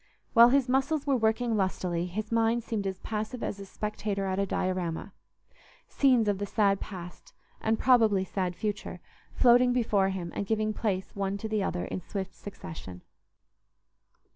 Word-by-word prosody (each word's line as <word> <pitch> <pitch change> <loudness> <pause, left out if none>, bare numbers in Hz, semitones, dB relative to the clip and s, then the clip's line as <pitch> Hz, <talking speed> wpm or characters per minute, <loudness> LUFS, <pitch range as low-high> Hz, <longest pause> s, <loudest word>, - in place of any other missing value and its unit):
While 235 0 +8
his 270 0 +3
muscles 270 +4 +1
were 280 -2 +2
working 225 0 +1
lustily, 180 -3 -1
his 215 +5 -5
mind 230 +1 +2
seemed 210 -4 -2
as 190 -1 -3
passive 220 +3 -4
as 200 - -3
a 195 - -8
spectator 210 -1 -3
at 190 0 -1
a 200 - +1
diorama: 185 0 -2 0.7
scenes 255 -6 +3
of 200 -2 +1
the 205 - -1
sad 200 -2 +2
past, 180 -3 -9 0.3
and 220 0 +1
probably 225 -7 +4
sad 185 -2 -2
future, 210 +1 -4 0.4
floating 245 0 +5
before 210 -5 +2
him 180 -3 -4
and 200 - -3
giving 215 0 0
place 195 -4 -2
one 195 0 -1
to 220 - -5
the 215 -1 0
other 180 -2 -2
in - - -4
swift 190 +1 -5
succession. 160 - -9
205 Hz, 165 wpm, -29 LUFS, 190-230 Hz, 0.7 s, While